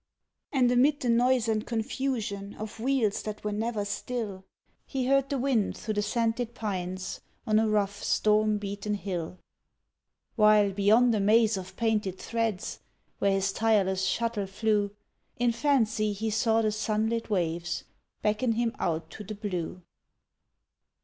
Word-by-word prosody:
And 255 -4 +3
amid 280 +4 +3
the 245 - 0
noise 245 0 +3
and 215 -1 +1
confusion 220 -4 -3
Of 215 +1 -7
wheels 240 -4 +1
that 215 -1 -6
were 210 - -1
never 215 0 -2
still, 205 -2 -4 0.4
He 265 -2 -2
heard 275 +1 +3
the 280 - 0
wind 250 -5 +1
through 215 - -3
the 205 - 0
scented 230 +2 -1
pines 185 -4 -4 0.2
On 215 -2 +3
a 220 0 +2
rough, 205 -1 0
storm 215 0 +3
beaten 205 +1 -3
hill; 185 -4 -4 1.0
While, 210 -2 +5
beyond 215 +5 +4
a 215 - +1
maze 220 +2 +4
of 185 -1 -7
painted 215 -4 0
threads, 225 -4 -2 0.4
Where 200 - +3
his 195 0 0
tireless 195 -4 +2
shuttle 225 -1 -1
flew, 205 +1 +1 0.5
In 245 0 +2
fancy 225 -5 +1
he 220 +2 -2
saw 225 +1 +2
the 215 - +2
sunlit 220 +2 -1
waves 175 -3 -1 0.4
Beckon 215 +3 +1
him 235 +1 -1
out 160 -1 -2
to 210 - -8
the 210 +2 -6
blue. 180 -4 -4
215 Hz, 145 wpm, -28 LUFS, 200-230 Hz, 1.0 s, While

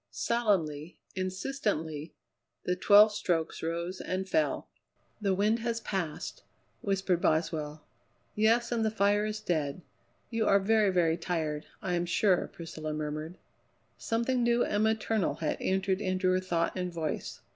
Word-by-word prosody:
Solemnly, 180 -9 0 0.2
insistently, 185 - -2 0.5
the 180 - 0
twelve 205 +3 +7
strokes 170 -5 -1
rose 170 +3 -3
and 190 +1 -3
fell. 315 +9 0 0.5
"The 195 -2 +2
wind 210 +4 +2
has 230 0 -1
passed," 190 -8 -4 0.4
whispered 190 -3 0
Boswell. 155 -1 0 0.5
"Yes, 230 +3 +3
and 230 -2 +1
the 220 - +2
fire 205 0 +2
is 215 0 -3
dead. 155 -1 -1 0.5
You 225 -2 0
are 200 - +6
very, 215 +1 +3
very 170 -3 +2
tired, 160 -4 -2 0.2
I 180 - -1
am 175 0 0
sure," 180 +1 +2
Priscilla 155 -2 -6
murmured. 155 +3 -4 0.6
Something 235 +2 0
new 235 0 +3
and 205 +1 +1
maternal 220 -6 +1
had 155 -1 -2
entered 190 +1 0
into 185 -1 +1
her 185 - +3
thought 175 -3 -1
and 180 -1 -2
voice. 160 -3 -4
185 Hz, 140 wpm, -30 LUFS, 165-215 Hz, 0.6 s, twelve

